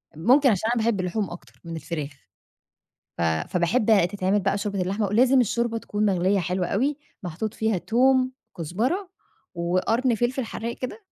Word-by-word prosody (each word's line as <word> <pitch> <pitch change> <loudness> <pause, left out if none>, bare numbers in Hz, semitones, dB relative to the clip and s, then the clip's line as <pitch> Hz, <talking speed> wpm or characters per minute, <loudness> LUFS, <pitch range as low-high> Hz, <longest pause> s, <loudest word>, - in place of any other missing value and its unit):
ممكن 255 - +4
عشان 220 +1 +1
أنا 230 - 0
باحب 225 -4 +1
اللحوم 185 +2 -1
أكتر 175 - -12
من 165 -1 -6
الفراخ، 150 -4 -6 1.0
ف - - 0
فباحب 175 - +2
تتعمل 200 0 +1
بقي 200 - 0
شوربة 200 -1 -2
اللحمة، 200 +3 -1
ولازم 250 +6 +4
الشوربة 235 0 0
تكون 210 -1 -2
مغليه 190 +1 +2
حلو 180 +1 -1
أوي، 255 +11 0 0.3
محطوط 190 +6 -4
فيها 220 -3 0
توم، 255 +5 +2 0.3
كزبرة، 245 - -2 0.4
وقرن 185 +9 +1
فلفل 240 +3 -1
حرّاق 230 +1 -4
كده. 385 - -6
205 Hz, 150 wpm, -25 LUFS, 180-240 Hz, 1.0 s, ممكن